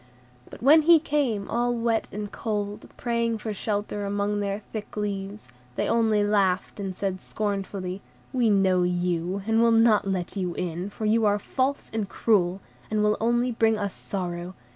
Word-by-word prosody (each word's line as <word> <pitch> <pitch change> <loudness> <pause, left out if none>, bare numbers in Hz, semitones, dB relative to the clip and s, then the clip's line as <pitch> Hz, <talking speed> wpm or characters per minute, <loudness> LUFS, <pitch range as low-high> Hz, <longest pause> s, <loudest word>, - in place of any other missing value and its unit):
But - - -11
when 305 +4 +7
he 335 +2 +7
came, 280 -10 0
all 240 +1 0
wet 230 -1 0
and 205 0 -5
cold, 205 -2 -4
praying 235 -1 0
for 215 0 -4
shelter 205 0 -2
among 205 +1 -1
their 200 +1 -2
thick 215 -1 -6
leaves, 200 -1 -4 0.3
they - - 0
only 220 -2 +3
laughed 200 -2 +1
and 195 -2 -4
said 185 -1 -3
scornfully, 195 -2 -3 0.3
"We 245 -3 +3
know 190 -3 +3
you, 180 +1 -1
and 225 +1 +3
will 235 - +5
not 225 -3 +4
let 185 -1 -2
you 180 -3 -2
in, 175 +2 -3
for 215 +2 -5
you 220 +1 +3
are 205 0 +3
false 265 +6 -2
and 215 -3 -2
cruel, 195 -4 +1 0.3
and 215 -1 +1
will 210 0 +3
only 240 +2 +2
bring 225 -1 +2
us 200 -2 -2
sorrow. 180 -1 -5
205 Hz, 170 wpm, -26 LUFS, 195-225 Hz, 0.3 s, when